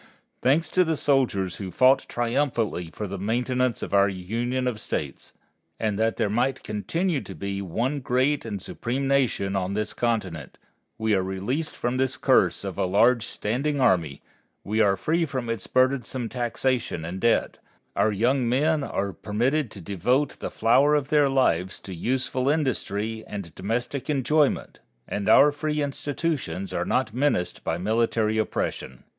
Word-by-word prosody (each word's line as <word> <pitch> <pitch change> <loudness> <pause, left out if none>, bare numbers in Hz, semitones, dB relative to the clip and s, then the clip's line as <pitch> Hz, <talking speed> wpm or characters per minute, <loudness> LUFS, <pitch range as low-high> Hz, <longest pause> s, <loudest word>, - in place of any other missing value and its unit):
Thanks 145 +6 +3
to 185 - +4
the 160 -2 -1
soldiers 120 -12 +1
who 95 -2 -5
fought 130 +9 +4
triumphantly 120 - -1
for 105 - -5
the 100 -1 -5
maintenance 125 +4 0
of - - -5
our 100 0 +5
Union 115 +7 -2
of 115 -4 -2
States, - - -4 0.5
and 105 -2 -1
that 110 0 +1
there - - +1
might 125 +5 0
continue 160 - -1
to - - -9
be 100 0 -4
one 120 - -1
great 130 +3 +1
and 105 -3 -4
supreme 130 +8 -3
nation 125 -8 +1
on 95 0 -1
this 105 0 -2
continent, 95 - -2 0.4
we 110 -1 +1
are 95 - +3
released 100 +12 -3
from 120 +1 -2
this 130 0 0
curse - - +3
of - - -5
a - - +2
large 115 +5 +3
standing 140 +7 -2
army, 85 - +2 0.4
we 110 +2 0
are 100 -2 +3
free 165 +2 +1
from 130 -6 -3
its 115 -4 -4
burdensome 130 -2 +1
taxation 120 -7 -1
and 90 +3 -5
debt, 115 - +1 0.4
our 110 - +3
young 120 +4 +1
men 150 +4 +2
are 100 -6 -2
permitted 120 +8 0
to 105 - -10
devote 125 - 0
the - - -4
flower 135 +7 +4
of 145 -1 -1
their 145 -2 +4
lives 95 -9 +1
to 95 - -9
useful 130 +6 -1
industry 110 -7 -1
and 100 -6 -7
domestic 120 +7 -3
enjoyment, 145 +1 +1 0.3
and 100 -1 -2
our 145 +1 +7
free 150 +1 -2
institutions 140 - -3
are 90 0 -1
not 125 0 0
menaced 130 -8 0
by 80 - -1
military 110 +2 +1
oppression. 65 -10 -3
120 Hz, 160 wpm, -25 LUFS, 100-135 Hz, 0.5 s, our